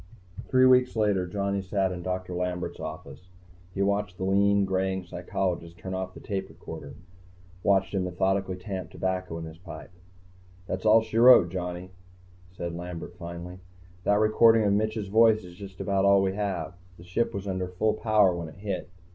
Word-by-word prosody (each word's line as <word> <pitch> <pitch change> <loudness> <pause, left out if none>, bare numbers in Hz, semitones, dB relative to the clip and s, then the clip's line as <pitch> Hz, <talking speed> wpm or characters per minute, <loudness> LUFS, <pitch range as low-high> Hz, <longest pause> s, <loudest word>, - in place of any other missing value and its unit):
Three 130 0 +4
weeks 125 -1 +5
later, 100 -4 +1
Johnny 100 +1 -1
sat 95 0 0
in 90 -1 -5
Doctor 90 0 -4
Lambert's 90 0 -3
office. 90 - -8 0.4
He 95 +2 -1
watched 100 -2 -1
the - - -4
lean, 100 +1 +3
graying 95 0 -1
psychologist 90 -1 -3
turn 95 +1 -6
off 95 0 -4
the - - -9
tape 95 -2 -4
recorder, - - -9 0.7
watched 95 -1 +2
him 95 -2 0
methodically 95 +1 0
tamp 95 -2 -6
tobacco 95 -2 -3
in 80 - -6
his 80 0 -11
pipe. 85 -1 -10 0.7
"That's 95 +3 -3
all 110 +1 +6
she 110 0 -2
wrote, 120 -8 +8
Johnny," 90 0 -5 0.6
said 85 -2 -5
Lambert, 90 0 -7
finally. 85 +1 -8 0.4
"That 105 +2 +3
recording 110 +1 +5
of 100 -1 +2
Mitch's 110 0 -1
voice 110 +1 +4
is 90 -1 -11
just 95 +1 -11
about 100 -1 0
all 100 0 +5
we 95 0 0
have. 95 -6 -3 0.2
The 85 - -13
Ship 90 +7 -1
was 100 0 -5
under 95 -1 -2
full 105 +4 0
power 105 -4 +3
when 85 -1 -5
it - - -14
hit. 95 -2 -4
95 Hz, 175 wpm, -27 LUFS, 90-100 Hz, 0.7 s, wrote